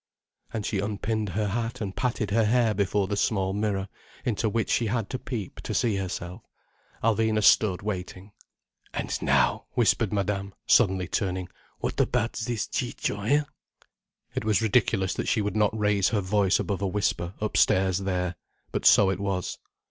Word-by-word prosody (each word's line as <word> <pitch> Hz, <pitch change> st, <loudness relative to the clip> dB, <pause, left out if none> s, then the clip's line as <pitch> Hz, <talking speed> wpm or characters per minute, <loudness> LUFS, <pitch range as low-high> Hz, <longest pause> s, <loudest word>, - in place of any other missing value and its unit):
And 110 Hz, -3 st, -3 dB
she 100 Hz, -, -1 dB
unpinned 105 Hz, +1 st, -2 dB
her 105 Hz, +3 st, -1 dB
hat 115 Hz, +2 st, -3 dB
and 100 Hz, -3 st, -4 dB
patted 115 Hz, -5 st, -1 dB
her 110 Hz, +1 st, +3 dB
hair 115 Hz, 0 st, +3 dB
before 100 Hz, 0 st, +1 dB
the 100 Hz, -, -1 dB
small 95 Hz, -2 st, 0 dB
mirror, 100 Hz, -2 st, -1 dB, 0.4 s
into 110 Hz, -2 st, 0 dB
which 110 Hz, +1 st, -1 dB
she 115 Hz, -, +2 dB
had 115 Hz, -1 st, -2 dB
to 130 Hz, -, -3 dB
peep 115 Hz, -9 st, -5 dB
to -, -, -4 dB
see 110 Hz, -5 st, +1 dB
herself. 90 Hz, +1 st, -5 dB, 0.6 s
Alvina 110 Hz, -1 st, +2 dB
stood 100 Hz, -3 st, +4 dB
waiting. 95 Hz, -1 st, -5 dB, 0.6 s
"And -, -, -2 dB
now—" -, -, +2 dB
whispered 115 Hz, -2 st, +2 dB
Madame, 100 Hz, -1 st, -2 dB
suddenly 95 Hz, -6 st, +3 dB
turning: 95 Hz, -2 st, -2 dB, 0.3 s
"What -, -, -2 dB
about 115 Hz, -, +1 dB
this 110 Hz, -1 st, -2 dB
Ciccio, -, -, -2 dB
hein?" 145 Hz, +9 st, +2 dB, 0.9 s
It -, -, -2 dB
was 110 Hz, -1 st, +2 dB
ridiculous 100 Hz, -3 st, +2 dB
that -, -, -3 dB
she 115 Hz, -, +2 dB
would 105 Hz, -2 st, -1 dB
not 110 Hz, 0 st, +2 dB
raise 105 Hz, -2 st, +2 dB
her 105 Hz, -3 st, 0 dB
voice 100 Hz, 0 st, +2 dB
above 100 Hz, -2 st, -2 dB
a 100 Hz, -, +1 dB
whisper, 95 Hz, -2 st, -1 dB
upstairs 95 Hz, -3 st, +2 dB
there. 90 Hz, -3 st, -2 dB, 0.3 s
But -, -, +1 dB
so 95 Hz, -2 st, +6 dB
it 95 Hz, -, -3 dB
was. 100 Hz, -2 st, -2 dB
105 Hz, 165 wpm, -26 LUFS, 95-110 Hz, 0.9 s, so